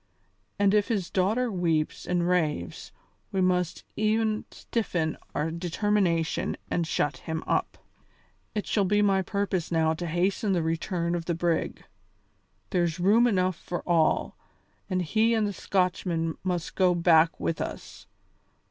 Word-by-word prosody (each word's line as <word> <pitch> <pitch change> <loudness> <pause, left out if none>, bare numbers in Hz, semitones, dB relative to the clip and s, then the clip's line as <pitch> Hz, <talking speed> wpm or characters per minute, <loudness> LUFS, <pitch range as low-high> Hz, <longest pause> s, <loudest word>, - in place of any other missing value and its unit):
And 200 0 +3
if 210 -1 +3
his 205 -7 -2
daughter 220 +6 +1
weeps 165 -5 -1
and 175 -1 +1
raves, 155 - -1 0.4
we 195 - -1
must 180 -2 +1
e'en 215 0 +1
stiffen 175 -9 -2 0.2
our 150 +2 0
determination 175 -1 0
and 170 -2 0
shut 145 -1 0
him 160 0 -4
up. - - -1 0.8
It 210 - -1
shall 205 - +1
be 205 +2 +2
my 195 -1 +3
purpose 190 -3 -2
now 160 -1 +2
to 175 +2 -4
hasten 190 +4 0
the 175 -3 +1
return 170 +1 -1
of 170 -1 -2
the 170 - -1
brig. 170 0 -1 0.9
There's 175 -1 0
room 215 +7 +5
enough 185 -5 +1
for 175 - -5
all, 165 -3 +2 0.5
and 185 -1 0
he 220 +7 +2
and 220 -1 +2
the 205 - -2
Scotchman 180 -4 0
must 180 -3 -2
go 185 -2 +3
back 165 -1 +4
with 165 - -2
us. - - -7
180 Hz, 145 wpm, -27 LUFS, 165-200 Hz, 0.9 s, room